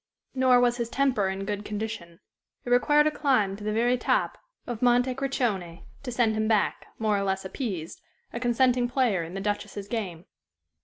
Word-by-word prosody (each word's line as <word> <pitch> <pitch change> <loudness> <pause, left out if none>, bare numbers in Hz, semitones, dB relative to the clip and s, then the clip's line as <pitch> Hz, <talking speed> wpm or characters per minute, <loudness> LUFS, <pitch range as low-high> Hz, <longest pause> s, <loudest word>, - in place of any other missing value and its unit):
Nor 255 -1 +4
was 245 0 +2
his 235 -2 -2
temper 255 -8 +1
in 190 +1 -4
good 205 0 -3
condition. 210 -5 -6 0.4
It 245 - -4
required 295 +5 +4
a 305 - +3
climb 255 -10 +1
to 205 - -10
the 215 - -1
very 240 +3 +2
top - - 0 0.3
of 240 -3 -5
Monte 245 +1 +3
Crocione 240 -11 -2 0.2
to 255 - -5
send 235 -2 +2
him 215 0 0
back, 215 -2 +1
more 215 -2 +1
or - - -1
less 190 0 -1
appeased, 190 - -5 0.3
a 235 - -3
consenting 245 0 +2
player 245 -8 +1
in 165 +3 -7
the 195 - -3
Duchess's 205 0 -3
game. 190 -7 -4
225 Hz, 185 wpm, -27 LUFS, 200-250 Hz, 0.4 s, Nor